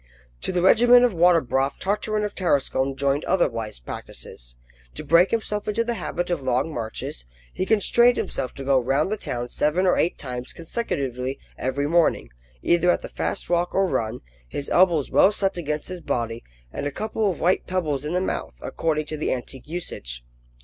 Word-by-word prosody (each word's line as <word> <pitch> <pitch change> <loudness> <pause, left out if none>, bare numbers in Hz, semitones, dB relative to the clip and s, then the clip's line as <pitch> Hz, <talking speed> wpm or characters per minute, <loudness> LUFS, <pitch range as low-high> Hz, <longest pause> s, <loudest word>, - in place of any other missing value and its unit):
To - - -1
the 180 -1 0
regimen 245 +5 +7
of 245 -4 +3
water 175 0 +5
broth 135 +2 0
Tartarin 210 +2 -1
of 210 -1 -3
Tarascon 135 -6 0
joined 140 +2 0
other 190 -2 +3
wise 115 - -5
practices. - - -8 0.4
To - - -6
break 170 +3 +5
himself 210 -2 -2
into 215 +2 +1
the 235 +1 -1
habit 175 -2 -3
of 175 - -1
long 130 +4 0
marches, 110 - -5 0.3
he 185 - -2
constrained 235 +3 +4
himself 130 -8 -3
to 135 - -7
go 135 -1 +3
round 135 - +1
the - - +1
town 120 -10 -4
seven 150 +9 +1
or 180 - +3
eight 175 - +1
times 125 -2 -6
consecutively 135 - -3 0.2
every 130 +2 -2
morning, 165 - +2 0.3
either 175 +1 +3
at - - +2
the - - -6
fast - - -3
walk 175 0 0
or 195 - +4
run, 115 -9 -2 0.3
his 140 - -5
elbows 170 -6 +3
well 195 - +6
set 195 -2 0
against 150 -3 -3
his 180 -1 -6
body, 115 -4 -2 0.3
and 145 - -3
a - - -3
couple 215 +3 -1
of 180 - -4
white 180 +2 +1
pebbles 155 -7 -1
in 150 +3 -3
the 180 - +1
mouth, 65 - -3
according 155 -2 -1
to 155 +1 -4
the 150 - -1
antique 130 +1 -5
usage. 60 - -5
160 Hz, 190 wpm, -24 LUFS, 130-185 Hz, 0.4 s, regimen